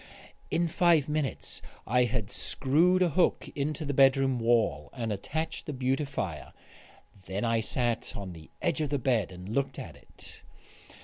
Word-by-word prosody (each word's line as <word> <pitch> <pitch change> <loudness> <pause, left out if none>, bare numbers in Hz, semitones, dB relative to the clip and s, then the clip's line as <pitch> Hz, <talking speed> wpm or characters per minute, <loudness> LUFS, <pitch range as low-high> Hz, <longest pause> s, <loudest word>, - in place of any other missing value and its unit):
In 170 +1 +1
five 165 -3 +3
minutes 150 -2 -2 0.2
I 125 +2 +3
had 115 -4 -2
screwed 175 +7 +2
a 175 - +3
hook 175 +3 +2
into 150 +2 -2
the 140 - -1
bedroom 135 -1 +4
wall 115 -12 +2
and 115 -3 -2
attached 160 +11 -4
the 150 - -3
beautifier. 130 - -2 0.7
Then 100 +5 -2
I 115 0 +2
sat 120 +1 -1
on 95 -3 -6
the 80 -1 -13
edge - - +1
of 150 - -1
the 145 - +1
bed 120 -7 +1
and 90 0 -9
looked 135 +3 -1
at - - -7
it. - - -14
130 Hz, 160 wpm, -29 LUFS, 110-150 Hz, 0.7 s, bedroom